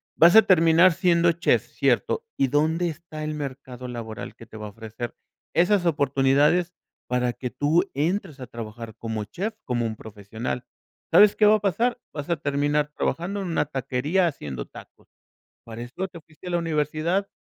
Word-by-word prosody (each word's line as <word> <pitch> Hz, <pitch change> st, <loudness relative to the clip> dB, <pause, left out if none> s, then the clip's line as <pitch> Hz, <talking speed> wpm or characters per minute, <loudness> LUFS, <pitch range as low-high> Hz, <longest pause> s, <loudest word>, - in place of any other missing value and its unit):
vas 170 Hz, +5 st, +6 dB
a 220 Hz, -, +9 dB
terminar 165 Hz, 0 st, +5 dB
siendo 170 Hz, -1 st, +3 dB
chef, 170 Hz, -, +1 dB
cierto, 465 Hz, -, 0 dB
¿y 135 Hz, -, +3 dB
dónde 160 Hz, +5 st, +1 dB
está 155 Hz, -1 st, -8 dB
el 155 Hz, -, -3 dB
mercado 130 Hz, -3 st, -6 dB
laboral 115 Hz, -2 st, -7 dB
que 115 Hz, -, -13 dB
te 110 Hz, -, -15 dB
va 105 Hz, -, -6 dB
a -, -, -7 dB
ofrecer 115 Hz, +2 st, -7 dB, 0.4 s
esas 180 Hz, +1 st, +3 dB
oportunidades 145 Hz, +4 st, +2 dB, 0.4 s
para 125 Hz, -1 st, +1 dB
que 125 Hz, +1 st, -5 dB
tú 155 Hz, +8 st, +2 dB
entres 160 Hz, +1 st, -1 dB
a 125 Hz, -, -7 dB
trabajar 115 Hz, -1 st, -8 dB
como 110 Hz, -2 st, -4 dB
chef, 195 Hz, -, -4 dB
como 120 Hz, -2 st, -1 dB
un 110 Hz, -1 st, -3 dB
profesional? 110 Hz, +3 st, -6 dB, 0.5 s
¿Sabes 200 Hz, +5 st, +7 dB
qué 215 Hz, -, +4 dB
va 215 Hz, -, +7 dB
a -, -, 0 dB
pasar? 230 Hz, +6 st, 0 dB
Vas 145 Hz, 0 st, -6 dB
a 170 Hz, -, +1 dB
terminar 145 Hz, +1 st, 0 dB
trabajando 195 Hz, +4 st, -2 dB
en 190 Hz, -, -4 dB
una 165 Hz, -, 0 dB
taquería, 140 Hz, +6 st, 0 dB
haciendo 70 Hz, -, -5 dB
tacos. -, -, -15 dB, 0.6 s
¿Para 115 Hz, 0 st, -9 dB
esto 125 Hz, +11 st, -4 dB
te 170 Hz, -2 st, -11 dB
fuiste 155 Hz, +4 st, -13 dB
a -, -, -4 dB
la 175 Hz, -, +1 dB
universidad? 165 Hz, +4 st, 0 dB
150 Hz, 175 wpm, -25 LUFS, 125-175 Hz, 0.6 s, a